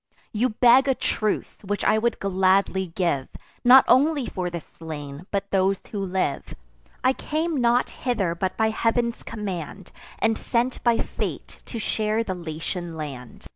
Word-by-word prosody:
You 235 +4 +1
beg 245 +4 +5
a 270 - +3
truce, 215 -3 -2
which 205 +1 -2
I 220 - +3
would 235 +1 0
gladly 190 0 +2
give, 170 -8 0 0.4
Not 255 +2 +8
only 285 +1 +4
for 180 -5 -3
the 170 0 -4
slain, 150 0 -9
but 200 0 -3
those 195 0 +2
who 200 -2 -3
live. 185 -6 -2 0.5
I 260 +1 +4
came 315 +3 -2
not 240 +1 +2
hither 215 -9 -1
but 185 +2 -3
by 220 0 +2
Heav'n's 235 +1 0
command, 195 -4 -6 0.3
And 225 0 +1
sent 245 +1 -1
by 235 -1 +4
fate - - -4
to 235 - -6
share 215 0 0
the 190 - -3
Latian 170 0 -5
land. 135 -5 -8
200 Hz, 155 wpm, -24 LUFS, 180-235 Hz, 0.5 s, Not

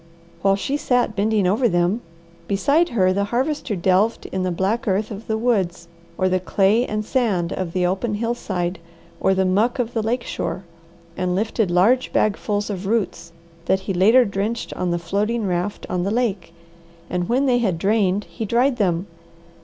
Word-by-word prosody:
While 195 +1 +3
she 270 +8 -2
sat 245 -6 +1
bending 210 -1 +1
over 225 +7 +2
them, 175 +5 +1 0.5
beside 285 - +2
her 185 -5 +2
the 200 +1 0
Harvester 255 +1 -1
delved 190 +5 +1
in 190 - -2
the 185 - 0
black 195 +8 -1
earth 205 +3 0
of 210 +2 -8
the 220 - 0
woods, 190 -7 0 0.3
or 185 - +2
the 185 0 +1
clay 200 +6 +2
and 215 0 -2
sand 205 -9 0
of 185 -3 -3
the 180 -1 +1
open 195 +5 -1
hillside, 195 -6 -2 0.4
or 190 - +2
the 190 0 +2
muck 210 +7 +2
of 245 -2 -2
the 225 - 0
lake 240 +3 -1
shore, 190 - -4 0.5
and 180 -1 -1
lifted 220 0 0
large 210 +9 +3
bagfuls 210 0 0
of 190 -1 -5
roots 195 -6 -1 0.3
that 190 +2 +1
he 195 0 -3
later 220 +8 +5
drenched 205 +3 -3
on 180 - -2
the 175 - 0
floating 205 +7 -1
raft 180 +2 -2
on 180 -1 -1
the 190 - -1
lake, 210 -7 -1 0.6
and 180 -1 -2
when 260 +4 +2
they 250 -2 +3
had 195 -8 0
drained 200 +1 +1
he 170 +5 -7
dried 245 +4 +2
them. 180 -4 +1
200 Hz, 180 wpm, -22 LUFS, 185-230 Hz, 0.6 s, later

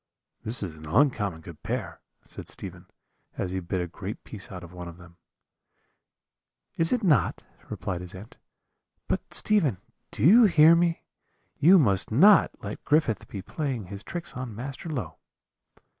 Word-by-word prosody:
"'This 110 0 -3
is 85 -5 -5
an 80 0 -11
uncommon 105 - +1
good 80 -1 -12
pear,' - - -4 0.2
said - - -10
Stephen, - - -6 0.5
as 90 - -2
he 95 - -2
bit 90 +1 -3
a 90 - -1
great 95 +4 -7
piece 105 -3 -9
out 90 -2 -8
of 85 0 -12
one 90 -1 -8
of 85 0 -10
them. 85 -1 -16 1.6
"'Is 165 0 +2
it 245 -3 +1
not?' 145 - +2 0.2
replied 90 -2 -4
his 90 +1 -9
aunt; 100 +5 -12 0.7
'but, - - -3
Stephen, 160 - +2 0.3
do - - -5
you 220 - +8
hear 165 -3 +6
me? 170 0 +1 0.6
you 180 +6 +7
must 100 - +2
not 190 - +6
let 105 0 -6
Griffith 145 -7 +1
be 100 -2 -7
playing 135 - -4
his 100 +2 -7
tricks 175 -5 -6
on 125 -4 -6
Master 135 +7 -7
Low.' 100 - -5
110 Hz, 160 wpm, -26 LUFS, -, 1.6 s, you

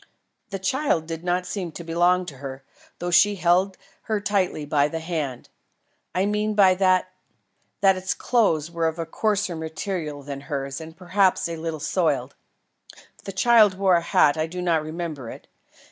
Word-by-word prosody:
The 195 - -4
child 190 - 0
did 165 0 -6
not 180 0 0
seem 180 -2 -4
to 170 - -7
belong 175 +2 +2
to 145 -6 -9
her, 135 0 -8 0.3
though 175 +1 -3
she 205 +4 +5
held 185 +1 +2 0.3
her 215 -1 +1
tightly 195 -7 0
by 145 -1 +2
the 160 +2 -4
hand. 155 -6 -4 0.7
I 185 +1 +2
mean 210 +1 0
by 195 -3 +6
that, 185 -1 +2 0.7
that 195 -1 +5
its 185 +1 -2
clothes 170 - +1
were 165 -1 0
of 160 +1 -3
a 165 - -3
coarser 205 +1 -1
material 160 -2 -4
than 140 -1 -6
hers 140 0 -4
and 160 +1 -10
perhaps 185 0 +2
were 170 - -4
a - - -5
little 160 -1 -4
soiled. 145 -5 0 0.9
If - - -22
the 195 - -4
child 215 0 +5
wore 195 -1 +3
a 170 - +2
hat, 150 -3 +3
I 155 +1 0
do 180 +2 -7
not 170 -3 +1
remember 155 -5 -5
it. - - -10
175 Hz, 180 wpm, -24 LUFS, 155-190 Hz, 0.9 s, by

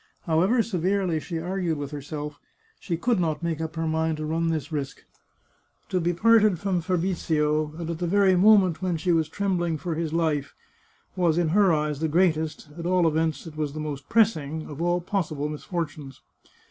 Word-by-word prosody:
However 185 +9 +2
severely 185 -4 0
she 165 +2 -5
argued 175 -1 -2
with 145 0 -5
herself, 150 0 -6 0.4
she 170 -3 -3
could 235 +3 +1
not 165 -1 -1
make 165 -2 -2
up 160 0 -4
her 165 0 -2
mind 160 0 0
to 155 - -4
run 165 +2 0
this 155 -1 -2
risk. 140 -3 -4 0.9
To 185 - 0
be 170 +1 +1
parted 215 +1 +4
from 185 0 -1
Fabrizio, 155 -4 0
and 170 -1 -5
at 165 -1 -4
the 175 - -1
very 195 +1 +4
mo 210 +4 +7
ment 185 -4 +1
when 180 -3 0
she 175 +3 0
was 160 -2 +2
trembling 175 -3 -1
for 165 +3 -3
his 160 -1 -2
life, 155 -4 -1 0.6
was, 170 -3 +2
in 170 -2 +2
her 195 +2 +4
eyes, 150 -2 0
the 160 - 0
greatest 160 -2 +1
— - - -18
at 170 - -3
all 180 -2 +3
events, 160 +1 0
it 160 -2 -9
was 150 -2 -2
the 155 - -5
most 145 -3 -5
pressing 160 -9 +1
— - - -11
of 145 +2 -7
all 175 +1 +1
possible 170 -6 -2
misfortunes. 150 -3 -5
165 Hz, 200 wpm, -25 LUFS, 155-180 Hz, 0.9 s, mo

